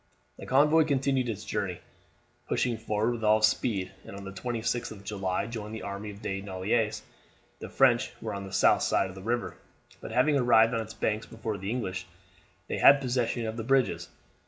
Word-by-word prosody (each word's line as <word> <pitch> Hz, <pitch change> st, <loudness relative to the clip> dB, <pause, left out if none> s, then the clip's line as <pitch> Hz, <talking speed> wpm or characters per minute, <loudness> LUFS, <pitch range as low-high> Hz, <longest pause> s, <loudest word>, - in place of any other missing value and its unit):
The -, -, -8 dB
convoy 150 Hz, +4 st, +5 dB
continued 135 Hz, -3 st, +1 dB
its 110 Hz, -, -5 dB
journey, -, -, -3 dB, 0.7 s
pushing 125 Hz, -2 st, 0 dB
forward 110 Hz, +1 st, 0 dB
with 120 Hz, -2 st, -5 dB
all 110 Hz, 0 st, +4 dB
speed, 105 Hz, -3 st, +1 dB
and -, -, -10 dB
on 100 Hz, -, -8 dB
the 100 Hz, -, -7 dB
26th 115 Hz, +3 st, -2 dB
of 100 Hz, -2 st, -10 dB
July 95 Hz, -2 st, -2 dB
joined 110 Hz, -1 st, -6 dB
the 110 Hz, -, -7 dB
army 100 Hz, +1 st, -5 dB
of 105 Hz, +1 st, -11 dB
De 95 Hz, -2 st, -3 dB
Noailles. 105 Hz, +3 st, -1 dB, 0.6 s
The -, -, -7 dB
French 125 Hz, -2 st, +3 dB
were 110 Hz, -2 st, -4 dB
on 100 Hz, 0 st, -5 dB
the 95 Hz, -, -9 dB
south 95 Hz, -, +4 dB
side -, -, +1 dB
of 95 Hz, -, -10 dB
the 95 Hz, -, -9 dB
river, 120 Hz, +4 st, -2 dB, 0.4 s
but -, -, -8 dB
having 145 Hz, +4 st, +3 dB
arrived 120 Hz, -2 st, +5 dB
on 115 Hz, -, 0 dB
its 110 Hz, 0 st, -8 dB
banks 110 Hz, 0 st, -1 dB
before 110 Hz, -2 st, -5 dB
the 95 Hz, +2 st, -4 dB
English 95 Hz, -6 st, -3 dB, 0.6 s
they -, -, -3 dB
had 140 Hz, 0 st, +8 dB
possession 120 Hz, -3 st, -1 dB
of 110 Hz, +1 st, -4 dB
the 115 Hz, -, -3 dB
bridges. 135 Hz, +1 st, +1 dB
110 Hz, 195 wpm, -28 LUFS, 100-120 Hz, 0.7 s, had